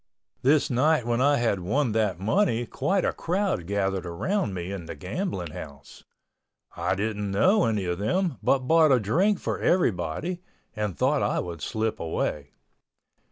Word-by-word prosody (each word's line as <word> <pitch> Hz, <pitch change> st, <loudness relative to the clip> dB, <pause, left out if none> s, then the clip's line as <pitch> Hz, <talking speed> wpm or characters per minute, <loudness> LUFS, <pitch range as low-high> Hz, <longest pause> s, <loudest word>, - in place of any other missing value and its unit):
This 145 Hz, +2 st, +3 dB
night 130 Hz, +1 st, +2 dB
when 120 Hz, +1 st, 0 dB
I 145 Hz, +1 st, +4 dB
had 115 Hz, -5 st, +1 dB
won 120 Hz, +8 st, 0 dB
that 105 Hz, -5 st, 0 dB
money 120 Hz, -, +1 dB
quite 190 Hz, -, 0 dB
a -, -, 0 dB
crowd 180 Hz, -, -1 dB
gathered 95 Hz, -2 st, -1 dB
around 175 Hz, -, -1 dB
me 90 Hz, +1 st, -4 dB
in 90 Hz, -4 st, -6 dB
the -, -, -6 dB
gambling 95 Hz, -, -4 dB
house. 70 Hz, -3 st, -10 dB, 0.7 s
I -, -, 0 dB
didn't 105 Hz, 0 st, -2 dB
know 185 Hz, -, +3 dB
any 105 Hz, -4 st, 0 dB
of 90 Hz, 0 st, -2 dB
them 170 Hz, -, 0 dB
but 130 Hz, -2 st, +1 dB
bought 160 Hz, -1 st, +5 dB
a 130 Hz, -, +5 dB
drink 180 Hz, -, +2 dB
for -, -, -3 dB
everybody 145 Hz, -, 0 dB, 0.3 s
and 105 Hz, -7 st, -3 dB
thought -, -, +2 dB
I -, -, 0 dB
would 85 Hz, -2 st, -5 dB
slip 110 Hz, 0 st, -2 dB
away. 75 Hz, -3 st, -2 dB
110 Hz, 160 wpm, -26 LUFS, 95-155 Hz, 0.7 s, bought